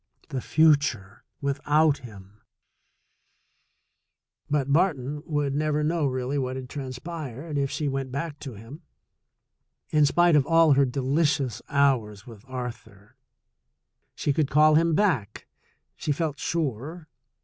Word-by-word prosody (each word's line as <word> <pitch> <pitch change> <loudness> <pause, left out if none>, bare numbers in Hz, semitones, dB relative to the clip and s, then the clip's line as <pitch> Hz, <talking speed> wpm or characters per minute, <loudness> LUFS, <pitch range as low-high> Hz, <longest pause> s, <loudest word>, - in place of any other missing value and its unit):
The 130 - -3
future 140 -12 +2 0.2
without 145 +2 +2
him! 105 -3 -13 2.1
But 140 -1 0
Barton 150 -4 +1
would 145 -3 -1
never 150 +1 0
know 160 -1 +1
really 130 +2 -2
what 130 -1 -2
had 130 -1 -7
trans 130 -3 -6
pired, 155 -1 -7
if 140 -1 0
she 150 - -2
went 135 -1 -3
back 145 +2 -4
to 135 -6 -8
him. 115 - -11 1.1
In 150 -1 +4
spite 175 +2 +4
of 140 -2 +3
all 165 -2 +5
her 140 0 +4
delicious 135 -2 0
hours 120 -8 +1
with 110 -4 -13
Arthur, 115 -5 -8 1.0
she 145 - 0
could 145 -1 0
call 155 +1 +5
him 165 +1 +3
back, 150 - 0 0.5
she 150 - -3
felt 150 -1 -2
sure. 155 +1 -3
140 Hz, 125 wpm, -26 LUFS, 125-155 Hz, 2.1 s, all